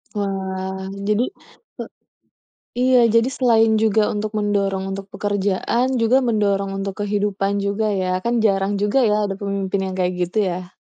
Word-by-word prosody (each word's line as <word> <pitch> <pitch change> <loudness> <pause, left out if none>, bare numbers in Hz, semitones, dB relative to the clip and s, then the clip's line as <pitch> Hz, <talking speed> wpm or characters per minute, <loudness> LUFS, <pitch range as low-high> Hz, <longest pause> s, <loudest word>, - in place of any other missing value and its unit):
Wah, 190 -1 -3 0.2
jadi, 210 +3 +2 0.5
ke - - -5 1.0
iya, 255 0 +4 0.2
jadi 230 +2 +4
selain 225 -3 +4
juga 220 0 +3
untuk 210 0 -3
mendorong 200 -2 0
untuk 195 0 -5
pekerjaan, 205 +4 0
juga 230 +3 +4
mendorong 200 -3 +1
untuk 195 -1 -3
kehidupan 200 -1 -1
juga, 200 +2 -1 0.2
ya, 185 0 0
kan 235 - +1
jarang 195 -1 +1
juga 210 +6 +2
ya, 210 -1 +3
ada 195 - -3
pemimpin 200 -1 -2
yang 190 - -4
kayak 180 0 +1
gitu, 180 +5 -7
ya. 180 +1 -6
200 Hz, 150 wpm, -21 LUFS, 195-215 Hz, 1.0 s, iya